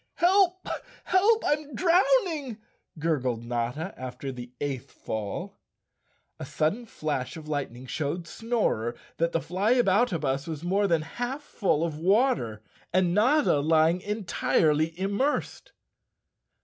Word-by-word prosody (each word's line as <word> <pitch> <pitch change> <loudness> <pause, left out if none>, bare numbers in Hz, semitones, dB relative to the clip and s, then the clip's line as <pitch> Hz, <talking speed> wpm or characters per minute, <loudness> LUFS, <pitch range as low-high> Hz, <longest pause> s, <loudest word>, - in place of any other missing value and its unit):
"HelpI 370 0 +3 0.3
Help! 430 +5 +3
I'm 295 -2 -1
drowning," 335 - +2 0.4
gurgled 130 -7 -1
Notta 120 +9 -2
after 130 +1 -6
the 120 -1 -8
eighth 140 -3 -3
fall. 110 -2 -5 0.8
A - - -5
sudden 200 +10 -1
flash 150 -4 -3
of 155 -1 -10
lightning 135 -4 -4
showed 155 +5 -3
Snorer 215 - -1 0.2
that 170 +1 +1
the 165 - +1
Flyaboutabus 185 - +1
was 160 -1 -5
more 195 +3 +2
than 165 -4 +2
half 245 - -4
full 175 - 0
of 160 -3 -3
water, 185 - +2 0.3
and 180 -1 +2
Notta 250 - +4
lying 160 +3 +3
entirely 165 -6 +1
immersed. 200 +10 -1
170 Hz, 115 wpm, -27 LUFS, 145-240 Hz, 0.8 s, Notta